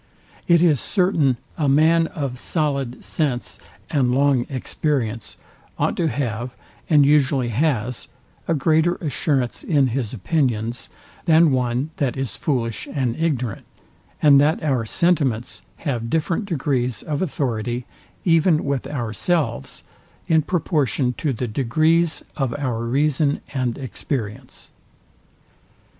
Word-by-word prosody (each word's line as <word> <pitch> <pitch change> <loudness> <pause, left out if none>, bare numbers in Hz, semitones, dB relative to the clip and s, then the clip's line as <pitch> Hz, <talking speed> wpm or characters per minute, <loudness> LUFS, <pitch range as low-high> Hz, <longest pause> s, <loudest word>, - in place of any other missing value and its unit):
It 170 -1 +5
is 155 -6 +4
certain 165 - +2 0.2
a 145 -3 +2
man 160 +4 +4
of 135 -6 -4
solid 140 -6 -2
sense 135 -6 -2 0.3
and 125 -5 +1
long 135 -3 +2
experience 130 -4 -2 0.4
ought - - 0
to 170 - +1
have, 125 -4 -3 0.3
and 150 -4 +6
usually 140 -3 +3
has, 125 -1 -1 0.4
a 165 - +2
greater 160 +4 +2
assurance 140 -5 -1
in 140 -5 +2
his 120 -2 -2
opinions, 120 - -1 0.4
than 165 -2 +5
one 125 +3 0
that 135 -3 -1
is 135 -6 -3
foolish 115 -6 -2
and 130 -5 -1
ignorant, 135 -9 -2 0.6
and 140 -2 +7
that 155 +3 +2
our 130 -6 +1
sentiments 140 -8 0 0.2
have 120 -7 -3
different 165 - 0
degrees 130 - -1
of 150 -2 -3
authority, 125 - -2 0.4
even 165 -2 +4
with 140 -2 -1
ourselves, 120 - -2 0.4
in 160 -1 +4
proportion 145 - 0
to 150 - 0
the 125 0 -3
degrees 155 +8 +1
of 135 -2 -1
our 120 -5 -2
reason 145 +3 +1
and 125 -4 -1
experience. 130 -2 -5
140 Hz, 120 wpm, -22 LUFS, 125-155 Hz, 0.6 s, and